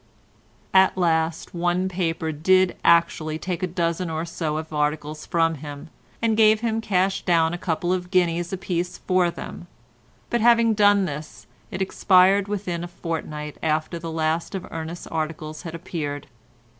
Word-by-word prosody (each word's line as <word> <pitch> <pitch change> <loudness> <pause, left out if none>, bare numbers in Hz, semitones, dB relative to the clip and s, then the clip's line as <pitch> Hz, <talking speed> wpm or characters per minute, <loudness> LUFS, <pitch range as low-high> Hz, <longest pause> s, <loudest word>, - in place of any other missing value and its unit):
At 190 0 +5
last 165 -2 0
one 175 +1 0
paper 165 -3 -2
did 185 +4 +3
actually 165 -2 +3
take 180 +2 -4
a 185 - 0
dozen 170 0 -1
or 160 +1 -2
so 160 -2 -3
of 160 0 -6
articles 150 +1 -2
from 165 -1 +2
him, 145 +1 -8 0.3
and 225 -1 +3
gave 215 0 +5
him 225 -1 0
cash 190 -2 +1
down 165 -2 +2
a - - -2
couple 175 +1 -1
of 180 -1 -3
guineas 175 -2 +1
apiece 180 -2 -3
for 185 -2 +2
them, 170 0 -8 0.6
but 240 - +1
having 235 -1 +5
done 205 -2 +4
this 150 -1 -7 0.2
it 190 -2 -2
expired 190 +1 +4
within 185 -4 -3
a - - -4
fortnight 155 -3 -5
after 155 +2 -1
the 165 0 -6
last 160 +3 -1
of 185 - -4
Ernest's 165 +2 -6
articles 155 -1 -4
had 170 -2 -7
appeared. 145 -4 -5
170 Hz, 155 wpm, -24 LUFS, 160-185 Hz, 0.6 s, At